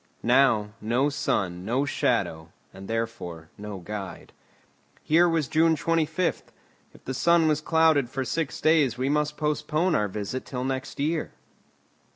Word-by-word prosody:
Now, 120 -4 +3
no 120 +6 +1
sun 90 -10 -1
no 125 +7 0
shadow, 80 - -1 0.2
and 95 0 -10
therefore 110 -8 -4
no 105 -1 -7
guide. 95 +2 -7 0.7
Here 170 +3 +4
was 165 -4 0
June 160 +4 +3
25. 165 +2 0 0.5
If - - -19
the 130 - -3
sun 165 +4 +3
was 155 -1 +1
clouded 160 -5 +3
for 135 +1 -3
six 160 +2 -2
days 150 -7 +3
we 130 +2 -1
must 150 0 0
postpone 150 +3 0
our 105 -7 +2
visit 105 +6 -4
till 125 -2 -5
next 130 +1 -4
year. 155 +3 -1
135 Hz, 145 wpm, -26 LUFS, 110-155 Hz, 0.7 s, Here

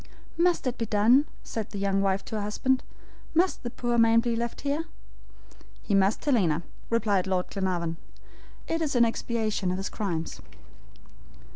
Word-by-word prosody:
"Must 345 -1 +2
it 255 0 -2
be 230 - -1
done?" 230 +8 +4 0.2
said 220 -2 -4
the 205 - -7
young 195 0 +1
wife 195 0 0
to - - -5
her - - -2
husband. 255 +6 +1 0.5
"Must 355 +3 +2
the 240 - -4
poor 240 -1 -1
man 230 0 +6
be 235 0 0
left 235 +2 -3
there?" 290 +3 -1 1.0
"He 205 - -2
must, 195 +6 +2
Helena," 180 - +2 0.3
replied 210 -5 +1
Lord 185 -1 -1
Glenarvan. 175 -4 -1 0.7
"It 330 0 -1
is 300 -4 -1
in 240 -1 +6
expiation 220 -4 -1
of 180 - -1
his 195 - -3
crimes." 170 -6 -3
220 Hz, 160 wpm, -27 LUFS, 195-245 Hz, 1.0 s, man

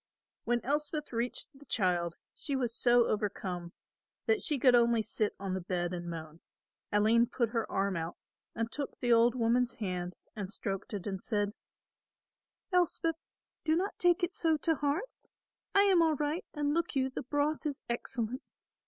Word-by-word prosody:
When 240 0 +1
Elspeth 300 +1 -1
reached 235 +5 -2
the 280 +1 -15
child 175 -5 +1 0.2
she 280 - -3
was 245 -3 0
so 240 -1 +5
overcome 185 -5 -2 0.5
that 435 -2 +2
she 300 - +1
could 255 -1 +5
only 235 -2 +4
sit 215 -1 -1
on 195 -1 -3
the 190 - -2
bed 175 0 -2
and 175 -1 -4
moan. 160 -1 -7 0.5
Aline 220 +3 +4
put 235 -1 0
her 230 -1 -2
arm 195 0 +1
out 165 +1 -4 0.4
and 230 0 -2
took 285 -1 -5
the 240 -1 +3
old 235 +1 +5
woman's 240 +1 +2
hand 180 -4 -3 0.2
and 200 -3 -5
stroked 195 +1 -4
it 195 - -5
and 190 -2 -3
said, 205 -2 0 1.2
"Elspeth, 335 -2 +2 0.5
do 315 -1 +3
not 380 +4 -1
take 355 +1 +3
it 350 +1 +1
so 320 -2 +2
to 325 +3 +2
heart. 295 - 0 0.7
I 400 - +7
am 380 -4 +5
all 320 -2 +4
right 300 - -1
and, 290 -1 +1
look 335 -1 0
you, 265 -1 +1
the - - -4
broth 290 +4 0
is 285 -1 -4
excellent. 235 +1 -2
240 Hz, 170 wpm, -32 LUFS, 200-295 Hz, 1.2 s, I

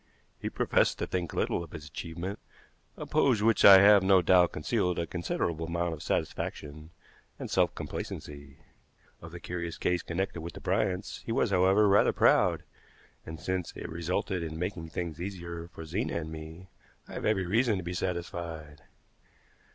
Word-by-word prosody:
He - - -3
professed - - +1
to - - -2
think 90 -3 -3
little 85 - -1
of 80 - -13
his 75 -2 -8
achievement, 85 +5 -6 0.6
a - - -6
pose 120 -7 +2
which 115 0 +3
I 95 -1 +10
have 100 0 +7
no 95 -1 +4
doubt 90 0 +4
concealed 85 +4 -1
a 85 - -1
considerable 85 -1 -3
amount 85 0 -1
of 75 - -8
satisfaction 75 +2 -4 0.5
and - - -7
self - - +2
complacency. 70 -1 -7 0.6
Of 80 - -10
the 90 - -8
curious 85 -1 -5
case 90 -1 0
connected 85 0 -3
with 85 +1 -7
the - - -9
Bryants, 95 +1 -1
he - - -5
was, 115 -3 +1
however, 95 +3 +4
rather 100 +1 +4
proud; - - +3 0.6
and, 80 0 -7
since 95 -2 -3
it - - -6
resulted 85 +2 -2
in 80 -1 -5
making 85 -2 -4
things 85 -1 -5
easier 85 -3 -6
for 85 -2 -10
Zena 95 +10 -2
and 80 0 -7
me, 80 +3 -9 0.4
I - - -11
have - - -5
every 100 -4 +1
reason 110 +3 +2
to 95 - -5
be 85 +1 -4
satisfied. 85 -4 -5
85 Hz, 170 wpm, -29 LUFS, 80-95 Hz, 0.6 s, I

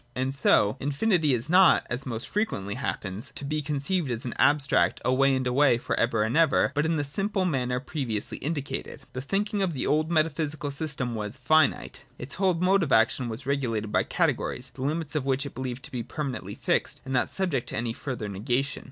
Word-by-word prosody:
And 130 +1 -1
so 120 -4 +3
infinity 150 - +2
is 120 +2 -1
not, 180 +1 +5
as 125 +3 -3
most 115 -2 -4
frequently 190 - -2
happens, 110 -2 -4
to 140 - -5
be 155 +2 -1
conceived 150 +2 -1
as 120 0 -2
an 120 - -3
abstract 140 -12 +3
away 135 +2 +3
and 130 -1 -1
away 125 0 +4
for - - -2
ever 115 -2 +2
and 110 +5 -1
ever, 160 -4 +4
but 145 +2 +1
in 165 - +1
the 145 - 0
simple 195 +6 -1
manner 125 -6 0
previously 130 -6 -3
indicated. 140 -2 -4
•'' - - -22
The 130 - -4
thinking 200 +7 -1
of 185 -3 0
the 135 - -2
old 155 +1 +1
metaphysical 155 -2 0
system 140 -4 -2
was 105 +2 -4
finite. 140 +1 +1
• - - -33
Its 125 +3 -7
whole 190 -2 +2
mode 185 +3 +3
of 160 -6 -1
action 115 +2 +3
was 115 +4 -6
regulated 115 -6 -1
by - - +3
categories, - - -1
the - - -10
limits 150 +2 -2
of 150 -3 0
which 135 +1 0
it 140 - -7
believed 130 0 -5
to 150 - -9
be 125 -3 -3
permanently 140 +1 -5
fixed - - -1
and 135 - -4
not 125 -2 +1
subject 175 -10 -1
to - - -4
any 115 0 -2
further 125 -4 -5
negation. 120 +8 -1
135 Hz, 210 wpm, -27 LUFS, 125-155 Hz, -, not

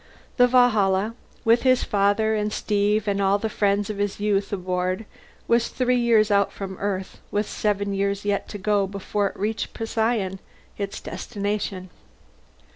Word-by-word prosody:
The 245 -1 +6
Valhalla, 220 -5 +3 0.3
with 230 +1 +5
his 255 -1 +3
father 205 +2 +2
and 210 0 -1
Steve 210 0 0
and 200 0 +1
all 195 +1 +3
the 220 +2 -2
friends 205 -1 +1
of 210 -2 -5
his 205 -1 -1
youth 205 -1 0
aboard, 185 +1 -2 0.4
was 235 0 +3
three 250 -1 +1
years 225 -3 +3
out 200 -1 +3
from 190 -1 -6
Earth 195 -2 -3
with 210 0 -1
seven 200 -1 -1
years 200 +1 -1
yet 205 -1 0
to 205 - -6
go 205 0 +1
before 200 +1 -1
it - - -8
reached 215 +2 -2
Procyon, 220 -4 -1 0.4
its 200 -1 -4
destination. 200 -3 -4
205 Hz, 155 wpm, -24 LUFS, 195-220 Hz, 0.4 s, The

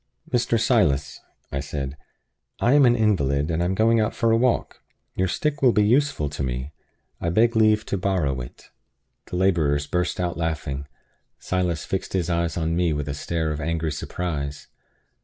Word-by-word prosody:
"Mr. 120 -1 +2
Silas," 105 - +2 0.3
I 70 - -2
said, 70 -1 -4 0.6
"I 120 - +3
am 145 -3 +6
an 120 - +4
invalid, 80 - +1
and 80 +1 0
I - - +1
am 95 +2 0
going 115 +2 +3
out 110 +1 0
for 115 -1 +2
a - - +5
walk. 120 +1 0 0.3
Your 95 - +1
stick 145 +10 -1
will 125 -3 +5
be 105 - +4
useful 135 - +2
to 75 - -6
me. 65 +2 -3 0.5
I 85 - -1
beg 115 +7 +3
leave 110 -1 +4
to 100 - -2
borrow 85 - 0
it." - - -12 0.6
The - - -6
laborers 80 -6 +2
burst 90 +5 -1
out 90 -2 -1
laughing. 70 -4 -3 0.5
Silas 90 -3 -1
fixed 95 - -3
his 90 -2 0
eyes 85 0 0
on 80 0 0
me 85 -2 +1
with 75 0 -3
a 70 - -2
stare 80 +2 -2
of 75 0 -4
angry 80 0 -1
surprise. 75 -3 -4
85 Hz, 180 wpm, -24 LUFS, 75-110 Hz, 0.6 s, am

